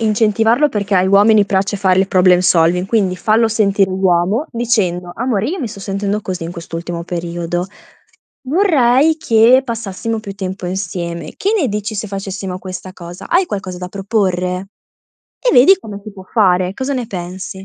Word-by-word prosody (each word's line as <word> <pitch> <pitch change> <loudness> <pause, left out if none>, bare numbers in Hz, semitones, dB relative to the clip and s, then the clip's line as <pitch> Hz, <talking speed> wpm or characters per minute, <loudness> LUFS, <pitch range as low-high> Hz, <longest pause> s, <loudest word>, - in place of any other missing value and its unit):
incentivarlo, 225 +5 +2
perché 200 -2 -2
ai 185 +1 +3
uomini 205 +2 +5
piace 195 +1 0
fare 190 -2 +2
il 190 - +1
problem 180 -1 +4
solving, 180 0 +2
quindi 195 -4 +1
fallo 220 +3 +2
sentire 200 -3 +1
uomo 190 - +1
dicendo: 205 -7 -1
"Amore 225 -2 -1
io 365 +5 -3
mi 255 - -2
sto 200 - -10
sentendo 200 +1 -2
così 180 -3 -4
in 170 - -6
quest'ultimo 170 0 -6
periodo. 175 0 -3 0.8
Vorrei 305 -4 +3
che 235 0 +4
passassimo 225 -1 -4
più 200 -2 -7
tempo 190 -1 -5
insieme. 175 -2 -4
Che 405 - 0
ne 310 - +1
dici 210 +1 -3
se 215 - -3
facessimo 195 -1 -5
questa 185 0 -7
cosa? 175 0 -10
Hai 360 +2 +2
qualcosa 190 - -5
da 180 0 -6
proporre?" 190 -2 -1 0.8
E - - +5
vedi 280 +11 +7
come 210 - -9
si 215 - -8
può 190 -2 -12
fare. 185 -3 +2
Cosa 265 +4 -3
ne 250 -3 -3
pensi? 190 -1 -7
195 Hz, 165 wpm, -16 LUFS, 180-225 Hz, 0.8 s, vedi